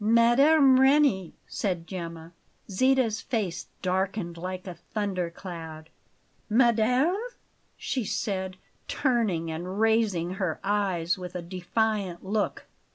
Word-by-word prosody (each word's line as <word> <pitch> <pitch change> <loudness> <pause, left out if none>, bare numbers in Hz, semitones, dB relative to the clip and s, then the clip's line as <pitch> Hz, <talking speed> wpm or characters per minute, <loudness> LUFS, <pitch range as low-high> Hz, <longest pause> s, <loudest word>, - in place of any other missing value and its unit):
"Mme. 260 +5 +5
Reni!" 265 - +3
said 180 -5 -2
Gemma. 170 -2 -7 0.4
Zita's 255 +1 +2
face 195 -8 -3 0.2
darkened 185 -1 -1
like 185 +2 -5
a 180 - -6
thunder 185 0 -3
cloud. 165 -3 -9 0.6
"Madame?" 245 - +3 0.6
she 260 -3 -2
said, 190 -2 -3 0.3
turning 210 - 0
and 180 +5 -5
raising 220 -6 +2
her 170 -5 -1
eyes 190 -3 0
with 180 0 -7
a 180 - -4
defiant 185 +1 -2
look. 205 +2 -1
195 Hz, 105 wpm, -27 LUFS, 175-230 Hz, 0.6 s, Mme